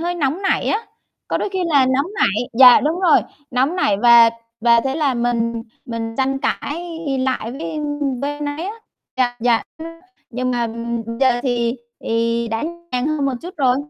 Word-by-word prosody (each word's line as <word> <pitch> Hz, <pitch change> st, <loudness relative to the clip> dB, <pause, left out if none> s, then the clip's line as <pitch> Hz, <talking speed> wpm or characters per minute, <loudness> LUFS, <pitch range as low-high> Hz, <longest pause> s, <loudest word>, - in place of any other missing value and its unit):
hơi 350 Hz, +1 st, -2 dB
nóng 310 Hz, +3 st, -1 dB
nảy 380 Hz, -, +1 dB
á, 440 Hz, +2 st, -1 dB, 0.4 s
có -, -, 0 dB
đôi -, -, -2 dB
khi 380 Hz, -, -2 dB
là 285 Hz, -5 st, +4 dB
nóng 265 Hz, +3 st, +1 dB
nảy 215 Hz, -, +1 dB
dạ, 250 Hz, +2 st, +8 dB
đúng 315 Hz, +6 st, -1 dB
rồi, 355 Hz, -4 st, +5 dB, 0.3 s
nóng 265 Hz, +8 st, +1 dB
nảy 210 Hz, -, +2 dB
và 235 Hz, -1 st, +8 dB, 0.3 s
và 235 Hz, 0 st, +5 dB
thế 270 Hz, +2 st, -2 dB
là 290 Hz, -5 st, +1 dB
mình 235 Hz, -1 st, -1 dB, 0.2 s
mình 225 Hz, -2 st, -4 dB
tranh 270 Hz, 0 st, 0 dB
cãi 330 Hz, +4 st, -3 dB, 0.2 s
lại 255 Hz, -3 st, -2 dB
với, 285 Hz, +5 st, -6 dB
a, 310 Hz, -, -5 dB, 0.5 s
với 285 Hz, -, 0 dB
anh 295 Hz, -, -4 dB
ấy 330 Hz, +4 st, -4 dB
á. 415 Hz, -, -5 dB, 0.4 s
Dạ, 245 Hz, -1 st, +1 dB
dạ, 235 Hz, -1 st, +2 dB, 0.2 s
nhưng 330 Hz, -, -7 dB, 0.4 s
nhưng 255 Hz, +1 st, -2 dB
mà, 240 Hz, -1 st, 0 dB
ừm, 230 Hz, 0 st, -4 dB
giờ 255 Hz, -2 st, +3 dB
thì 240 Hz, -1 st, 0 dB, 0.2 s
thì 230 Hz, +1 st, -1 dB
đã 225 Hz, 0 st, -2 dB, 0.3 s
nhàn 250 Hz, +2 st, 0 dB
hơn 305 Hz, -2 st, -1 dB
một 270 Hz, -, 0 dB
chút 355 Hz, +2 st, -8 dB
rồi. 260 Hz, -3 st, +3 dB
255 Hz, 195 wpm, -19 LUFS, 235-295 Hz, 0.5 s, dạ